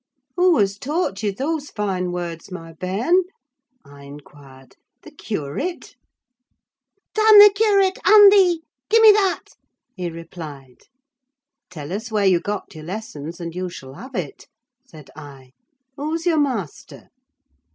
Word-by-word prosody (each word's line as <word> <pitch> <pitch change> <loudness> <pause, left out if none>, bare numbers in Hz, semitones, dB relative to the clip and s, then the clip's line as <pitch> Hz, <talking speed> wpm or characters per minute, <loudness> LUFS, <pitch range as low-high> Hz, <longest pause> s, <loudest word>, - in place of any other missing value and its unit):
"Who 355 -2 +3
has 200 0 0
taught 295 - -3
you 210 -2 -1
those 290 +7 -4
fine 190 -4 -3
words, 175 0 -6
my 165 -2 -9
bairn?" 205 - 0 0.6
I 140 0 -15
inquired. 140 -2 -15 0.3
"The 315 - -13
curate?" 220 - -6 1.2
"Damn 435 -1 +6
the 410 0 +10
curate, 400 -3 +2
and 415 -1 +8
thee! 360 -5 +3 0.3
Gie 455 - +4
me 445 -1 +8
that," 400 -3 0 0.5
he 180 -3 -4
replied. 160 -6 -11 0.8
"Tell 155 -2 -8
us 220 +4 -6
where 210 -2 0
you 185 -3 +4
got 205 +3 -6
your 155 - -11
lessons, 170 -4 -7
and 170 -1 -6
you 180 +1 -4
shall 135 -6 -11
have 255 - -11
it," 165 -7 -6 0.4
said 155 - -15
I. 140 -4 -13 0.4
"Who's 310 +4 -4
your 330 -3 +2
master?" 235 - -4
195 Hz, 135 wpm, -21 LUFS, -, 1.2 s, the